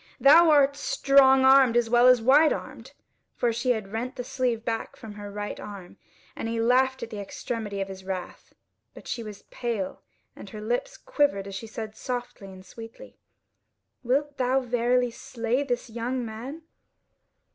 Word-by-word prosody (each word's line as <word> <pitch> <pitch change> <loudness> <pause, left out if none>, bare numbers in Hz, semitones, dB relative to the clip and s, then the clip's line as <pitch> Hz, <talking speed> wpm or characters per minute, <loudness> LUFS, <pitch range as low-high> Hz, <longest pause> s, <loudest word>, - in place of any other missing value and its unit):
thou 325 +5 +7
art 285 -2 +4
strong 270 -2 +4
armed 265 -3 +6
as 240 -1 +2
well 240 +2 +5
as 250 -2 +5
white 290 +6 +5
armed;" - - -6 0.4
(for 235 -1 0
she 240 +3 -2
had 215 -5 -1
rent 235 +4 -4
the 245 - -5
sleeve 245 -2 -2
back 225 -1 -3
from 220 -2 -10
her 205 0 -8
right 205 0 -5
arm) 200 -4 -10 0.4
and - - -4
he 230 0 -2
laughed 260 +2 +2
in 230 - -6
the 210 - -7
extremity 205 0 -5
of 195 - -3
his 190 -1 -9
wrath. 185 -1 -7 0.4
But - - -13
she 240 - -3
was 210 -3 -9
pale 225 -6 -4 0.3
and 200 - -11
her 215 - -9
lips 240 - -3
quivered 280 -10 0
as 200 - -8
she 210 +4 -6
said 220 0 -7
softly 245 -4 -6
and 185 0 -13
sweetly: 230 - -12 0.9
"Wilt 280 +3 -1
thou 255 +1 +2
verily 245 0 +1
slay 235 +2 -3
this 250 -3 -3
young 240 +2 -3
man?" 245 +9 -8
240 Hz, 170 wpm, -26 LUFS, 220-260 Hz, 0.9 s, thou